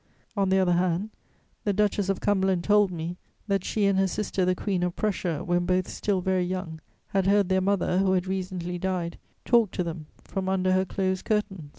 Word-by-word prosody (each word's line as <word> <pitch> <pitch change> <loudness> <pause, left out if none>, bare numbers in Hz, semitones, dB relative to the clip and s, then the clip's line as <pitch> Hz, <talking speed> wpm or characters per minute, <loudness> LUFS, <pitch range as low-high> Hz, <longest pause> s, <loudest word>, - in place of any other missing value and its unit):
On 195 -2 +1
the 190 - +3
other 185 -2 +3
hand, 180 +4 +1 0.5
the 205 - +1
Duchess 205 -1 +1
of 195 - 0
Cumberland 190 -3 +1
told 205 0 +4
me 170 0 -5 0.3
that 195 -2 +1
she 210 +1 0
and 195 -1 +3
her 195 - +3
sister 190 0 -1
the 185 0 +2
Queen 190 -1 -1
of 180 -1 -1
Prussia, 180 -7 -1
when 175 0 0
both 185 0 +1
still 195 -3 -1
very 185 0 +1
young, 180 -3 -4 0.3
had 195 -1 +1
heard 200 -1 +3
their 190 0 +3
mother, 190 -1 +1
who 190 -1 +3
had 180 -1 +1
recently 185 -2 -3
died, 180 -2 -2 0.3
talk 235 -4 +4
to 180 - -2
them 165 -2 -6 0.2
from 190 -1 -3
under 185 -1 +1
her 185 0 +3
closed 190 0 -2
curtains. 205 -8 -1
185 Hz, 205 wpm, -26 LUFS, 180-195 Hz, 0.5 s, told